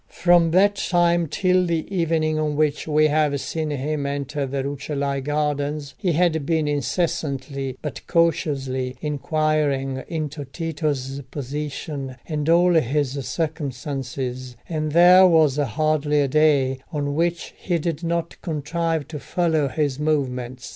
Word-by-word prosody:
From 175 -1 +4
that 200 +4 +4
time 175 -2 +2
till 185 +3 +2
the 165 -2 -1
evening 160 -2 +1
on 150 -1 -1
which 150 0 0
we 155 0 +3
have 150 -2 +2
seen 155 +2 -3
him 145 0 -2
enter 140 0 -3
the 135 0 -2
Rucellai 140 0 -2
gardens, 145 0 -2
he 180 -3 -1
had 160 -2 +2
been 160 +1 0
incessantly, 140 -2 -2
but 145 -7 -6
cautiously, 135 -6 0
inquiring 150 -2 0
into 155 -3 -4
Tito's 145 -3 -3
position 140 -1 -5
and 150 -1 -2
all 175 +1 +5
his 145 -3 +1 0.2
circumstances, 130 -5 -4
and 155 -2 -2
there 180 +2 +8
was 155 -5 +4
hardly 150 +2 +1
a 140 - +2
day 135 -2 +3
on 145 -2 -2
which 170 +2 -1
he 175 -2 -1
did 165 0 -3
not 170 0 -2
contrive 165 -1 -2
to 150 - -6
follow 160 -2 0
his 145 -1 -1
movements. 130 -5 -2
150 Hz, 135 wpm, -23 LUFS, 140-165 Hz, 0.2 s, there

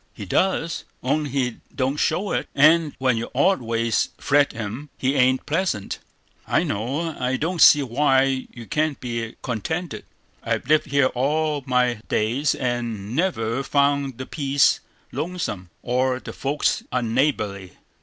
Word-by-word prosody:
He - - -7
does, 175 -3 0 0.2
only 145 +3 0
he 125 -3 -1 0.2
don't 135 +1 0
show 195 +6 0
it; - - -2
and 155 +1 +5
when 130 -3 +1
your 115 - -3
odd 185 +4 +3
ways 115 -1 0
fret 145 0 +3
him, 115 +6 -6
he 130 +1 0
ain't 130 -1 +3
pleasant, 155 - -1 0.5
I - - +2
know. 140 +10 -2
I 130 +1 0
don't 165 +3 -2
see 145 -1 +8
why 135 0 +2
you 120 -1 -10
can't 150 +2 -1
be 115 -2 -4
contented; 145 - -3 0.4
I've - - -2
lived 155 +1 +3
here 140 -2 +2
all 150 +3 0
my 125 -3 +1
days, 130 +7 +1
and 120 -4 -3
never 130 -8 0
found 140 -2 +1
the 130 - -5
place 140 -1 +2 0.3
lonesome, 155 - -4
or 125 +1 +1
the - - -8
folks 140 +2 0
unneighborly." 115 - -1
130 Hz, 145 wpm, -23 LUFS, 120-150 Hz, 0.5 s, see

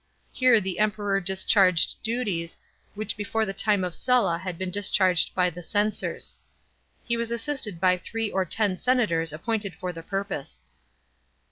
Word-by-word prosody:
Here 255 -3 +5
the 190 -2 -4
Emperor 205 -2 0
discharged 190 -1 +3
duties 210 -8 -2 0.4
which 215 +1 -4
before 220 +2 -1
the 195 - -3
time 205 -1 +1
of 180 -2 -3
Sulla 210 -5 +1
had 185 -1 -6
been 185 0 -3
discharged 190 -3 +2
by 180 -1 +2
the 175 - -9
censors. 205 +5 -1 0.7
He 235 -1 -1
was 230 0 -2
assisted 235 - -1
by 180 +1 +3
three 225 +4 -3
or 190 - +1
ten 190 0 0
senators 180 -11 +1
appointed 200 +3 -3
for 180 +1 -5
the 165 - -8
purpose. 195 -5 -5
195 Hz, 150 wpm, -25 LUFS, 180-220 Hz, 0.7 s, Here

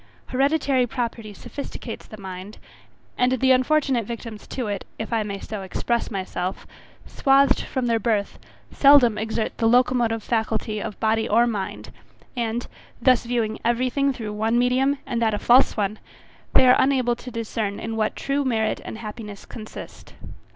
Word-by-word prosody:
Hereditary 270 -1 +2
property 230 -3 -4
sophisticates 235 +2 -8
the 215 - -9
mind, 190 +1 -8 0.6
and 250 +1 +3
the 260 +1 +3
unfortunate 260 -1 +3
victims 230 -2 -7
to 255 - -4
it, 205 -2 -3
if 220 +1 -5
I 225 - +2
may 200 -2 -4
so 215 0 -6
express 235 +5 -2
myself, 185 -2 -4 0.4
swathed 275 0 +3
from 260 -2 -3
their 230 -1 +2
birth, 210 -2 -1 0.3
seldom 270 -7 +6
exert 220 0 -2
the 225 - +3
locomotive 240 -2 +3
faculty 220 -1 -1
of 205 - -6
body 220 0 +1
or 230 +3 +5
mind; 210 -5 -4 0.4
and, 235 0 -2 0.3
thus 250 -1 +4
viewing 230 -2 -1
every 240 +2 +1
thing 275 +1 +2
through 220 -5 -5
one 220 +3 +1
medium, 255 +3 +2
and 235 -1 -2
that 220 -2 +2
a - - -2
false 245 +4 +4
one, 210 0 -1 0.6
they 260 - +7
are 250 - +6
unable 255 -3 +2
to 255 - -9
discern 225 -3 -3
in 225 0 -4
what 215 -1 0
true 280 +1 -1
merit 225 -4 0
and - - -7
happiness 210 -2 -8
consist. 215 -2 -10
230 Hz, 160 wpm, -23 LUFS, 215-255 Hz, 0.6 s, they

